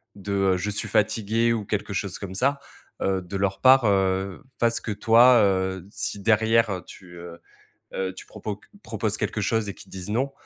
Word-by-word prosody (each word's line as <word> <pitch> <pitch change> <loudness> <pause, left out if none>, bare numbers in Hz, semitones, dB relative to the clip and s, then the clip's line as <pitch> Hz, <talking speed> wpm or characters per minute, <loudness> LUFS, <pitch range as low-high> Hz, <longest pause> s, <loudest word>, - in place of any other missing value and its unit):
de 100 0 -7
heu: 95 -1 +2
«Je 95 +4 -3
suis 105 +2 -2
fatigué» 110 +2 +1
ou 110 -2 -2
quelque 100 0 -3
chose 95 -1 -3
comme 95 -2 -7
ça, 140 +6 +1 0.4
heu, 95 -1 +1
de 90 +3 -8
leur 95 0 -1
part, 130 -2 +6
heu, 95 -1 0 0.2
fasse 115 0 +2
que 110 - -4
toi, 115 +3 +5
heu, 95 -1 0
si 105 - -3
derrière, 110 -1 +2
tu, 90 -2 -14
heu 85 0 -10 0.6
heu, 95 -1 -2
tu - - -10
propoc 105 0 -7 0.2
proposes 110 -1 -2
quelque 110 - -2
chose 110 0 0
et 100 - -5
qu'ils - - -15
disent: 95 0 -7
«non», 130 +5 -1
100 Hz, 190 wpm, -24 LUFS, 95-115 Hz, 0.6 s, part